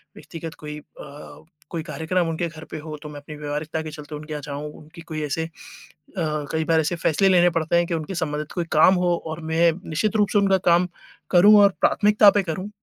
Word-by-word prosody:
व्यक्तिगत 165 -1 -8
कोई 150 0 -7
अ, 145 +1 -13 0.3
कोई 165 -2 -3
कार्यक्रम 165 +2 -1
उनके 165 +1 -2
घर 160 -1 -11
पे - - -5
हो 155 0 -7
तो 150 - -7
मैं 145 -1 -8
अपनी 150 +1 -10
व्यावहारिकता 150 +2 -4
के 155 - -7
चलते 150 0 -9
उनके 150 +1 -7
यहाँ 150 - -4
जाऊँ, 145 +1 -6
उनकी 155 +3 -14
कोई 160 -2 -6
ऐसे 150 +2 -2
अ, - - -9 0.7
कई 155 -1 -2
बार 165 -1 +3
ऐसे 155 +3 -1
फैसले 170 +4 +2
लेने 175 -1 +5
पड़ते 165 0 0
हैं 170 - +3
कि 170 - -3
उनके 165 +3 -4
संबंधित 150 -3 -3
कोई 175 -2 -2
काम 160 +5 +6
हो 180 -1 +1
और 160 +1 -5
मैं 165 +1 +4 0.2
निश्चित 170 +8 -1
रूप 210 -1 +2
से - - +4
उनका 195 -1 +3
काम 175 +1 +4 0.4
करूँ 200 +4 +7
और 200 - +7
प्राथमिकता 210 0 +5
पे 205 -1 +1
करूँ। 185 +3 -4
160 Hz, 220 wpm, -23 LUFS, 150-175 Hz, 0.7 s, करूँ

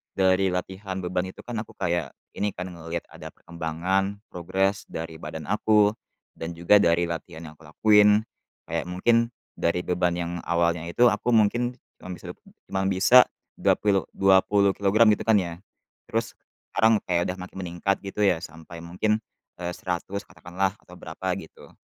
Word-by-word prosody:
dari 95 0 +3
latihan 95 +1 -4
beban 90 +1 -1
itu 95 - -11
kan, 120 -1 -6
aku 110 - -7
kayak 85 -5 -1 0.2
ini 105 0 -1
kan, 90 - -5
ngelihat 85 0 -5
ada - - -10
perkembangan, 90 +4 -2
progres 95 +3 -1
dari 80 0 -5
badan 80 -1 -7
aku, 105 0 +3 0.5
dan 80 +1 -4
juga 85 +5 +5
dari 85 +1 +3
latihan 85 0 -6
yang - - -18
kulakuin, 105 +7 +4 0.4
kayak 80 0 -2
mungkin 115 +6 +2 0.3
dari 85 +1 +1
beban 90 0 +1
yang 85 -1 -3 0.2
awalnya 85 -1 +1
itu 120 +9 +4
aku 110 +3 -1
mungkin 120 +3 +2 0.2
cuma 90 - -8
bisa - - -15
dap - - -17 0.3
cuma 95 - -2
bisa 95 +7 +5 0.4
dua - - +3
pilu 100 -2 +1
20 95 +1 +4
kilogram, 105 +3 +4
gitu, - - -7
kan, 110 - +5
ya, 85 -4 -1 0.5
terus - - -2 0.4
sekarang 110 -1 +4
kayak 85 -1 0
udah 90 - -4
makin 95 - -11
meningkat, 90 +2 -1
gitu, 100 +1 -3
ya, 90 -5 +3
sampai 80 0 -10
mungkin, 90 +6 -1 0.4
eee, 90 0 -3
100 95 +3 -4
katakanlah, 95 +2 -3
atau - - -15
berapa, - - -7
gitu. - - -14
95 Hz, 160 wpm, -25 LUFS, 85-100 Hz, 0.5 s, juga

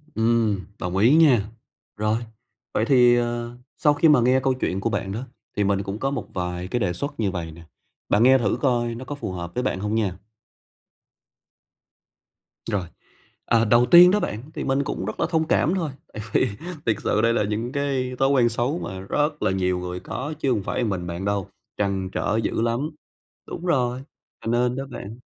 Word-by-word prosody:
Ừm, 110 -2 +2 0.2
đồng 90 +1 -3
ý 115 +9 +5
nha. 130 -11 +5 0.5
Rồi, 105 +1 +1 0.6
vậy 110 - +1
thì, 125 -2 +5
ờ, 120 0 -2 0.2
sau 150 - +4
khi 160 +2 +4
mà 150 - +6
nghe 130 +2 +4
câu 130 0 +1
chuyện 95 -7 -2
của 105 - -1
bạn 100 -2 -2
đó, 110 +4 -4 0.4
thì 105 - +2
mình 100 0 +1
cũng 100 +2 -5
có 135 +2 -1
một 130 -7 -4
vài 90 0 -3
cái 120 - -1
đề 95 -6 0
xuất 140 +8 -5
như 100 -4 +1
vầy 85 -3 -5
nè, 85 +2 -13 0.5
bạn 105 - +4
nghe 130 +2 +7
thử 115 -6 0
coi 120 -3 +1
nó 130 +3 -8
có 145 - -5
phù 145 - -5
hợp 85 -1 -6
với 125 - -1
bạn 110 - -1
hông 105 +2 -2
nha. 100 -5 -1 2.5
Rồi. 100 -2 0 0.6
Ờ, 115 -1 +3
đầu 120 +3 +5
tiên 175 +7 +8
đó 210 - +3
bạn, 110 - -3
thì - - -4
mình 135 +1 +1
cũng 135 -8 -4
rất 110 - -5
là - - +2
thông 160 -2 +1
cảm 160 - +2
thôi, 165 -6 -2 0.2
tại 105 - -6
vì - - +3 0.4
thiệt 115 - +2
sự 105 - +1
đây 115 +1 +3
là 115 - +1
những 110 +4 -2
cái 135 -3 -1
thói 135 - +3
quen 130 -4 +4
xấu 120 +8 -1
mà 95 - -6
rất 150 +10 -1
là - - +2
nhiều 90 -1 0
người 90 0 -5
có 145 - -5
chứ 135 - +1
hông 105 -5 0
phải - - -3
một 115 - 0
mình 90 -3 -3
bạn 85 +3 -4
đâu, 100 -2 -1 0.3
trăn 95 -2 -1
trở 105 - -1
dữ - - -1
lắm. 120 +6 0 0.6
Đúng 170 - -7
rồi, 125 -6 +1 0.4
cho 115 - 0
nên 120 +1 +1
đó 135 +1 -4
bạn 110 +1 -8
115 Hz, 210 wpm, -24 LUFS, 100-130 Hz, 2.5 s, tiên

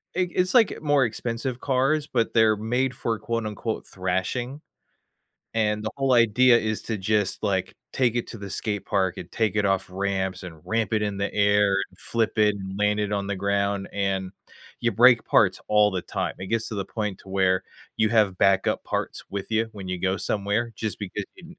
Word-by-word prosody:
i - - -1
it's 180 +1 +1
like 235 -4 +4
more 145 -3 +3
expensive 120 +2 -3
cars, 140 +3 +1
but 115 -5 0
they're 110 -2 +5
made 125 +4 0
for 115 -2 -2
quote, 115 -1 -2
unquote, 110 +1 -4
"thrashing?" 95 +9 -3 0.9
And 105 -1 +1
the 110 - -2
whole 135 -1 +1
idea 120 +1 +5
is 110 -1 -2
to 110 -2 -3
just, 100 0 0
like, 95 -3 -1 0.2
take 125 -3 +1
it 120 - -1
to 115 - -8
the 100 -1 -7
skate 105 +1 -2
park, 95 -3 0
and - - -8
take 110 -3 0
it 105 - +2
off 95 -1 +1
ramps, 95 0 -2
and 85 -4 -9
ramp 115 -2 -1
it 110 - +2
in 105 -1 -2
the 100 0 -2
air, 100 -1 +3
and - - -24
flip 115 -1 -1
it, 105 -1 +4
and 95 -1 -7
land 105 0 +2
it 105 0 -1
on 100 -1 -1
the 100 - -2
ground, 100 0 0
and 95 -2 -1 0.5
you 120 -1 +1
break 120 +3 +6
parts - - +3
all 105 -1 +4
the 95 -2 -3
time; - - -3
it 95 - -6
gets 115 +1 0
to - - -5
the 100 -1 -2
point 105 -1 -4
to - - -16
where 95 -1 +2 0.3
you 110 - +3
have 105 -5 +3
backup 95 -1 +2
parts - - -3
with 100 -1 -4
you, 115 0 +1
when 100 -3 -8
you 90 0 -2
go 95 +1 +1
somewhere, 105 +4 -1
just 110 -2 -3
because 100 0 -4
you 180 - -14
105 Hz, 205 wpm, -25 LUFS, 100-115 Hz, 0.9 s, break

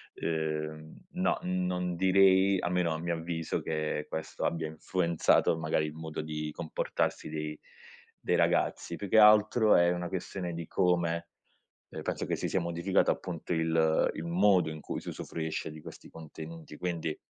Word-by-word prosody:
uhm, 80 -1 -3 0.2
no, - - +1
non 90 -1 -1
direi 95 +1 +4
almeno 90 -1 0
a 80 - -3
mio 85 0 -2
avviso, 80 -1 -3
che 75 -1 -2
questo 80 - -4
abbia 80 -1 -1
influenzato 85 0 +1
magari 80 -1 0
il 75 - -7
modo 80 0 -5
di 75 0 -4
comportarsi 80 - -2
dei 75 0 -4 0.6
dei - - 0
ragazzi, - - +1
più 100 - -6
che 110 - +6
altro 110 +1 +6
è 85 0 +5
una 90 0 -2
questione 90 -1 -4
di 85 0 -5
come, 85 -2 +1 0.6
ehm, - - -7
penso - - -3
che - - -1
si - - -3
sia 95 - +1
modificato 85 +2 +1
appunto 85 -1 -4
il 80 -1 +2
il 80 - -5
modo 90 -1 +3
in 80 - -8
cui - - -4
si - - -7
usufruisce 80 -1 -4
di 80 - -10
questi - - -11
contenuti. 80 0 -10
Quindi, 85 -3 -2
85 Hz, 160 wpm, -30 LUFS, 80-90 Hz, 0.6 s, che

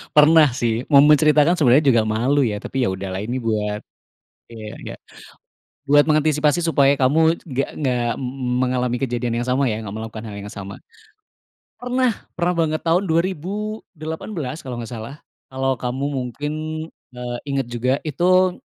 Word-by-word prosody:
pernah 150 0 +7
sih. 115 -2 0
Mau 140 -2 +7
menceritakan 150 +2 +5
sebenarnya 140 +1 +5
juga 115 - +4
malu 125 +7 +1
ya, 110 -6 0
tapi, 135 +5 -4
ya - - 0
udah 95 +1 -4
lah, 95 - -3
ini 120 +4 -3
buat 105 -3 -2 0.7
iya, 110 -2 -8
nggak - - -9 0.9
buat 145 +1 +6
mengantisipasi 155 +2 +2
supaya 140 -4 +3
kamu 160 +5 +3
c - - -22
nggak 135 -3 -2
nggak 125 -5 0
m 130 - -4
m 125 0 -4
mengalami 125 -1 0
kejadian 120 -2 -1
yang 120 - -4
sama, 130 +1 +2
ya, 110 +1 -3
nggak 100 0 -7
melakukan 110 0 -7
hal 105 -2 -7
yang 100 0 -8
sama. 100 -1 -8 1.0
Pernah 250 0 +1 0.3
pernah 180 +1 +1
banget 155 -2 0
tahun 175 +4 +3
2018 170 -3 -3
kalau 125 -2 -5
nggak 115 +1 -7
salah, 115 +4 -7 0.3
kalau 135 0 0
kamu 125 +3 -3
mungkin, 140 +2 -4 0.6
eee, 125 0 -4
ingat 135 -2 -1
juga, 120 +2 -1
itu 180 +4 +3
135 Hz, 160 wpm, -21 LUFS, 120-155 Hz, 1.0 s, pernah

